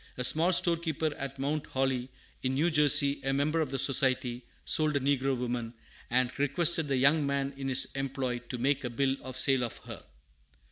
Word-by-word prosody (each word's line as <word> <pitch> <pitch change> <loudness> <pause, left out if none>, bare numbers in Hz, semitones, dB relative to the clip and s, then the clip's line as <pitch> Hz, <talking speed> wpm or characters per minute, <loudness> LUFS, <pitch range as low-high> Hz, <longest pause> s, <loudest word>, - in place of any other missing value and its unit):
A 125 - -3
small 160 +7 +6
storekeeper 165 -3 +1
at 140 0 -7
Mount 145 +3 -3
Holly, 130 -1 -2 0.3
in 130 0 -2
New 165 +5 +1
Jersey, 145 -1 +4
a 135 - -1
member 150 +4 0
of 155 - -3
the 135 - -4
Society, 130 -2 +2 0.2
sold 155 -1 +2
a - - +2
negro 135 -1 -1
woman, 120 -1 -5 0.3
and 125 0 0
requested 160 +3 +1
the 135 -2 -1
young 140 +4 +2
man 140 0 -2
in 135 0 -6
his 135 0 +2
employ 135 -2 -4
to 125 - -5
make 135 +3 -1
a 125 - -4
bill 135 +3 -1
of 130 -1 -8
sale 135 -2 +2
of 120 - -5
her. - - -10
135 Hz, 190 wpm, -28 LUFS, 130-145 Hz, 0.3 s, small